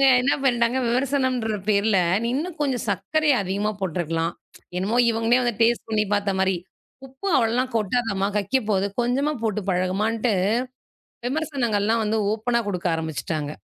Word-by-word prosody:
அவங்க 275 - +5 0.2
என்ன 275 - +2
பண்ணிட்டாங்க, 240 -1 +2
விமர்சனம்ன்ற 255 -3 0
பேர்ல, 200 -1 +3 0.3
நீ - - 0
இன்னும் 335 +3 -4
கொஞ்சம் 265 -4 -1
சக்கரைய 310 -3 +1
அதிகமா 200 +3 -1
போட்டிருக்கலாம், 165 -2 -1 0.4
என்னமோ 215 +6 0
இவங்களே 230 +2 +2
வந்து 240 -3 -1
டேஸ்ட் 235 0 +2
பண்ணி 215 -1 +2
பாத்த 200 -1 0
மாரி, 190 -1 +2 0.5
உப்பு 265 +8 -9
அவ்வளவுலாம் 245 +2 +1
கொட்டாதம்மா 205 -2 0
கக்கிப்போது. 205 -2 0 0.2
கொஞ்சமா 275 +5 0
போட்டுப் 210 -2 -2
பழகுமான்னு 210 +6 0 1.0
விமர்சனங்கள் 265 -8 -1
எல்லாம் 225 +1 +2
வந்து 220 +1 0
ஓபனா 235 +2 0
கொடுக்க 180 -2 -3
ஆரம்பிச்சிட்டாங்க. 160 -2 -3
225 Hz, 135 wpm, -23 LUFS, 195-250 Hz, 1.0 s, அவங்க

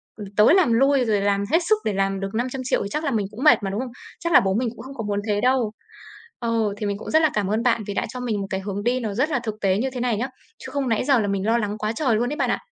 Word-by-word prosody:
ừm, 210 -2 -8
tới 210 +9 +6
làm 345 -12 +4
lui 270 +2 +3
rồi 210 -3 +1
làm 200 0 +1
hết 330 - +5
sức 435 - +5
để 210 - 0
làm 195 0 0
được 195 0 -3
500.000.000 255 +1 -1
thì 200 - -5
chắc 300 - -2
là 285 - 0
mình 215 -4 0
cũng 225 +5 -7
mệt 305 -8 +6
mà, 195 - -1
đúng 200 +2 -3
không? 255 -1 -4 0.3
Chắc 340 -1 -2
là - - +9
bố 190 0 0
mình 235 +4 0
cũng 225 - -10
không 265 +2 -9
có 230 - -4
muốn 205 -1 0
thế 205 -1 0
đâu. 250 -3 +2 0.7
Ừ, 230 -3 0
thì 210 - -4
mình 200 -1 -1
cũng - - -7
rất 315 - +5
là 315 - +4
cảm 205 -2 0
ơn 215 +3 0
bạn 235 -3 +2
vì 205 - -3
đã - - -1
cho 250 - -7
mình 225 -5 -2
một 195 - -4
cái 190 - -2
hướng 200 +1 -4
đi 245 +3 +1
nó 220 -4 -3
rất 265 +9 +1
là 285 -5 0
thực 220 -3 -4
tế 190 -1 +2
như 260 +5 0
thế 255 - -5
này 240 -3 0
nhá, 245 +5 -1 0.4
chứ - - -7
không 275 -2 -1
nãy 225 - +1
giờ 270 -3 +4
là 210 - 0
mình 195 -1 -1
lo 225 +2 +3
lắng 210 -2 -2
quá 215 0 -2
trời 250 -3 +1
luôn 240 +3 0
ấy - - -3
bạn - - 0
ạ. - - 0
225 Hz, 335 wpm, -23 LUFS, 205-255 Hz, 0.7 s, là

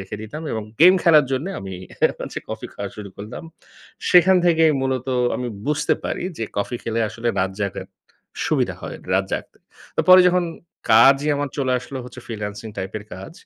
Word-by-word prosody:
রেখে 95 +2 -7
দিতাম, 130 +9 -7
এবং 110 - -2 0.2
গেম 180 +3 +9
খেলার 155 -4 +6
জন্যে 140 +9 -1
আমি 95 -1 -7 0.5
হচ্ছে, - - -5
কফি - - -5
খাওয়া 100 -1 -5
শুরু 105 -2 -7
করলাম। 105 +9 -8 0.7
সেখান 185 +1 +6
থেকেই 165 -2 +4
মূলত 130 -1 -1 0.3
আমি 125 -1 -3 0.2
বুঝতে 150 0 +1
পারি - - -3
যে, 115 - -1
কফি 110 +4 -2
খেলে 115 0 -2
আসলে 115 +3 -3
রাত 95 0 0
জাগার 100 -2 -3 0.6
সুবিধা - - +1
হয়। - - -6 0.2
রাত 95 +1 +2
জাগতে। - - -5 0.4
তো - - +3
পরে 185 0 +10
যখন 180 0 +2 0.5
কাজই 135 +6 +6
আমার 145 0 -2
চলে 130 -2 +1
আসলো 130 +2 -7
হচ্ছে, 125 +1 -10
ফ্রিল্যান্সিং 105 -1 -6
টাইপের 100 +2 -5
কাজ 95 +10 -9
125 Hz, 175 wpm, -22 LUFS, 105-150 Hz, 0.7 s, পরে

